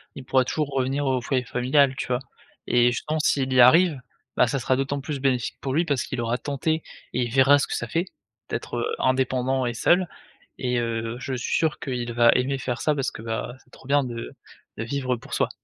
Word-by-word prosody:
Il 135 Hz, -, -9 dB
pourra 130 Hz, 0 st, +3 dB
toujours 150 Hz, +2 st, -1 dB
revenir 135 Hz, +2 st, 0 dB
au 130 Hz, -2 st, +1 dB
foyer 130 Hz, 0 st, 0 dB
familial, 130 Hz, +3 st, +2 dB
tu -, -, -4 dB
vois? 125 Hz, -1 st, 0 dB, 0.5 s
Et 120 Hz, 0 st, +4 dB
je 120 Hz, -, -3 dB
pense 155 Hz, 0 st, -1 dB
s'il 130 Hz, -2 st, +1 dB
y 125 Hz, -, +6 dB
arrive, 150 Hz, +3 st, +6 dB, 0.3 s
bah, -, -, +4 dB
ça 140 Hz, -, -1 dB
sera 130 Hz, 0 st, +1 dB
d'autant 135 Hz, +2 st, -1 dB
plus 145 Hz, 0 st, -4 dB
bénéfique 130 Hz, -4 st, 0 dB
pour 135 Hz, 0 st, -2 dB
lui 170 Hz, +3 st, +2 dB
parce 140 Hz, -6 st, 0 dB
qu'il 130 Hz, -1 st, -4 dB
aura 120 Hz, +1 st, -1 dB
tenté 155 Hz, +3 st, -1 dB, 0.3 s
et 125 Hz, -, 0 dB
il 120 Hz, -, -6 dB
verra 135 Hz, +3 st, +5 dB
ce -, -, -1 dB
que -, -, -3 dB
ça 115 Hz, -, -3 dB
fait 165 Hz, +9 st, -1 dB, 0.4 s
d'être, -, -, -4 dB
heu, 455 Hz, +1 st, -1 dB
indépendant 130 Hz, 0 st, +1 dB
et 120 Hz, -, -3 dB
seul, 175 Hz, +9 st, +3 dB, 0.5 s
et, 125 Hz, -2 st, 0 dB
heu, 115 Hz, 0 st, -3 dB
je 130 Hz, 0 st, -4 dB
suis 120 Hz, -, -3 dB
sûr 160 Hz, -2 st, +1 dB
qu'il 120 Hz, -3 st, -4 dB
va 120 Hz, 0 st, +5 dB
aimer 130 Hz, +2 st, 0 dB
faire 125 Hz, -2 st, -3 dB
ça 150 Hz, -, +2 dB
parce 135 Hz, -2 st, -1 dB
que, -, -, -9 dB
bah, 115 Hz, +2 st, -4 dB
c'est -, -, -30 dB
trop 130 Hz, -, -16 dB
bien 145 Hz, 0 st, +3 dB
de 120 Hz, -2 st, -6 dB, 0.5 s
de 110 Hz, -, -3 dB
vivre 130 Hz, +1 st, -2 dB
pour -, -, -12 dB
soi. -, -, +1 dB
130 Hz, 230 wpm, -24 LUFS, 120-140 Hz, 0.5 s, y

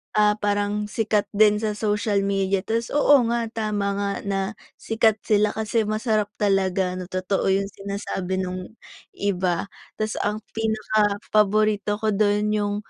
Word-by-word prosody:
ah, 210 Hz, 0 st, +4 dB
parang 205 Hz, 0 st, 0 dB
sikat 215 Hz, -2 st, +1 dB
din 210 Hz, 0 st, +5 dB
sa 215 Hz, -1 st, -1 dB
social 210 Hz, -1 st, 0 dB
media. 195 Hz, -1 st, +1 dB
Tapos 230 Hz, +1 st, -1 dB
oo 290 Hz, -3 st, +5 dB
nga 235 Hz, -1 st, 0 dB
tama 210 Hz, -3 st, -2 dB
nga 200 Hz, 0 st, -1 dB, 0.2 s
na 195 Hz, -1 st, 0 dB, 0.4 s
sikat 225 Hz, -1 st, +1 dB
sila 210 Hz, -1 st, +2 dB
kasi 220 Hz, 0 st, 0 dB
masarap 215 Hz, -1 st, 0 dB
talaga 190 Hz, -2 st, +1 dB
na 180 Hz, -, -6 dB
totoo 185 Hz, +1 st, -1 dB
yung 195 Hz, +1 st, +1 dB
sinasabi 195 Hz, -2 st, -3 dB
nung 185 Hz, +3 st, -6 dB, 0.4 s
iba. 185 Hz, -1 st, -1 dB, 0.2 s
Tapos 215 Hz, 0 st, -2 dB
ang 210 Hz, +1 st, -2 dB
pinaka 215 Hz, -2 st, +1 dB, 0.2 s
paborito 210 Hz, 0 st, +2 dB
ko 220 Hz, -1 st, +1 dB
dun 210 Hz, +1 st, +2 dB
yung 205 Hz, -1 st, 0 dB
210 Hz, 145 wpm, -23 LUFS, 200-215 Hz, 0.4 s, din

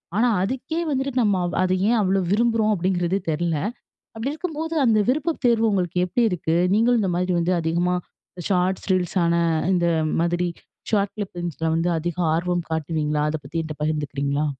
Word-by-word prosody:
ஆனா 235 Hz, +3 st, +3 dB, 0.2 s
அதுக்கே 265 Hz, -, -3 dB
வந்துட்டு 270 Hz, 0 st, -1 dB
நம்ம 205 Hz, -4 st, +2 dB, 0.2 s
அது 185 Hz, 0 st, +1 dB
ஏ -, -, +3 dB
அவ்ளோ 195 Hz, 0 st, +2 dB
விரும்ப்றோம் 225 Hz, 0 st, +2 dB
அப்டிங்கிறது 180 Hz, 0 st, 0 dB
தெரில. 165 Hz, +1 st, 0 dB, 0.6 s
அப்படி 225 Hz, +5 st, -3 dB
இருக்கும்போது 320 Hz, 0 st, -4 dB
அந்த 220 Hz, -3 st, +4 dB
விருப்பத் 305 Hz, +5 st, 0 dB
தேர்வு 230 Hz, -1 st, +4 dB
உங்களுக்கு 180 Hz, -3 st, -1 dB
எப்படி 235 Hz, +7 st, 0 dB
இருக்கு? 165 Hz, -2 st, -1 dB, 0.2 s
நீங்களும் 230 Hz, +3 st, +3 dB
இந்த 195 Hz, -, 0 dB
மாதிரி 180 Hz, 0 st, 0 dB
வந்து 170 Hz, +2 st, +1 dB
அதிகமா 175 Hz, +2 st, 0 dB, 0.5 s
ஷார்ட்ஸ் 185 Hz, 0 st, 0 dB
ரீல்ஸான 180 Hz, -2 st, +1 dB, 0.4 s
அந்த 180 Hz, -2 st, +2 dB, 0.4 s
மாதிரி 175 Hz, +1 st, 0 dB, 0.4 s
ஷார்ட் 200 Hz, -2 st, +1 dB
கிளிப்பிங்ஸில்ல 175 Hz, -5 st, -4 dB
வந்து 165 Hz, +2 st, +1 dB
அதிக 170 Hz, +1 st, -3 dB, 0.2 s
ஆர்வம் 175 Hz, +1 st, -1 dB
காட்டுவீங்களா 150 Hz, -1 st, -1 dB
அதப்பத்தி 150 Hz, 0 st, -5 dB
என்ட்ட 155 Hz, -1 st, -5 dB
பகிர்ந்துக்கிறீங்களா? 145 Hz, -1 st, -1 dB
180 Hz, 150 wpm, -23 LUFS, 165-220 Hz, 0.6 s, அந்த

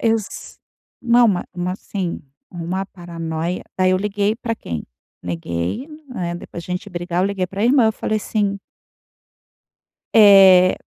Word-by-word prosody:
Eles 225 Hz, -3 st, -2 dB, 0.4 s
Não, 240 Hz, -1 st, +5 dB
ma 185 Hz, -3 st, 0 dB
uma, 180 Hz, +1 st, -2 dB
assim, 190 Hz, -2 st, -4 dB, 0.3 s
uma 180 Hz, +2 st, -3 dB
paranoia. 170 Hz, -1 st, -5 dB, 0.2 s
Aí 185 Hz, 0 st, +4 dB
eu 185 Hz, -, +3 dB
liguei 205 Hz, +2 st, 0 dB
pra 230 Hz, -2 st, -3 dB
quem? 80 Hz, -, -6 dB, 0.4 s
Negei, 85 Hz, -, -3 dB, 0.2 s
né. 175 Hz, -9 st, -4 dB
Depois 170 Hz, 0 st, -8 dB
de -, -, -10 dB
a 180 Hz, -, 0 dB
gente 200 Hz, +2 st, -6 dB
brigar, 175 Hz, 0 st, -2 dB
eu -, -, +2 dB
liguei 195 Hz, -2 st, -2 dB
para 195 Hz, +3 st, -3 dB
irmã, 245 Hz, -1 st, +5 dB
eu 220 Hz, -, +2 dB
falei 215 Hz, 0 st, -2 dB
assim 200 Hz, -2 st, -1 dB, 1.6 s
"Eh, 195 Hz, -4 st, +8 dB
185 Hz, 150 wpm, -20 LUFS, 175-210 Hz, 1.6 s, Eh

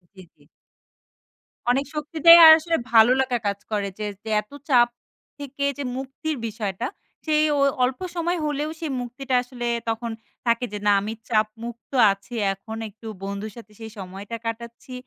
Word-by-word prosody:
জি, 190 Hz, -, -12 dB
জি। -, -, -25 dB, 1.3 s
অনেক 275 Hz, +3 st, +1 dB
শক্তিতে 310 Hz, +2 st, +1 dB, 0.2 s
আর 315 Hz, -, +12 dB
আসলে 330 Hz, +1 st, -1 dB, 0.2 s
ভালো 225 Hz, +1 st, +7 dB
লেখা 255 Hz, -2 st, +1 dB
কাজ 200 Hz, 0 st, -2 dB
করে 205 Hz, -2 st, 0 dB
যে, 210 Hz, -, -2 dB, 0.2 s
যে 220 Hz, -, -7 dB
এত 210 Hz, -, -26 dB, 0.2 s
চাপ 240 Hz, -3 st, +6 dB, 0.5 s
থেকে 280 Hz, 0 st, -6 dB
যে 285 Hz, -, -3 dB
মুক্তির 275 Hz, +4 st, -4 dB
বিষয়টা, 215 Hz, 0 st, -4 dB, 0.4 s
সেই 305 Hz, -1 st, +3 dB
ও -, -, +1 dB, 0.2 s
অল্প 250 Hz, +1 st, 0 dB, 0.2 s
সময় 345 Hz, +1 st, 0 dB
হলেও 295 Hz, +1 st, -2 dB
সেই 315 Hz, -4 st, -3 dB
মুক্তিটা 255 Hz, +2 st, -3 dB
আসলে 245 Hz, -1 st, -6 dB, 0.2 s
তখন 230 Hz, +1 st, -3 dB, 0.3 s
থাকে। 235 Hz, +1 st, +2 dB
যে, -, -, -2 dB
না, 205 Hz, -, +6 dB
"আমি 215 Hz, +2 st, -4 dB, 0.2 s
চাপ 215 Hz, -2 st, +3 dB, 0.2 s
মুক্ত 235 Hz, +2 st, -9 dB, 0.2 s
আছি। 195 Hz, +5 st, -8 dB, 0.2 s
এখন 220 Hz, +3 st, -9 dB
একটু 220 Hz, +2 st, -13 dB, 0.2 s
বন্ধুর 200 Hz, +2 st, -5 dB
সাথে 220 Hz, -2 st, -12 dB
সেই 220 Hz, -1 st, -8 dB
সময়টা 195 Hz, +4 st, -7 dB
কাটাচ্ছি, 235 Hz, +2 st, -6 dB
240 Hz, 165 wpm, -24 LUFS, 215-275 Hz, 1.3 s, আর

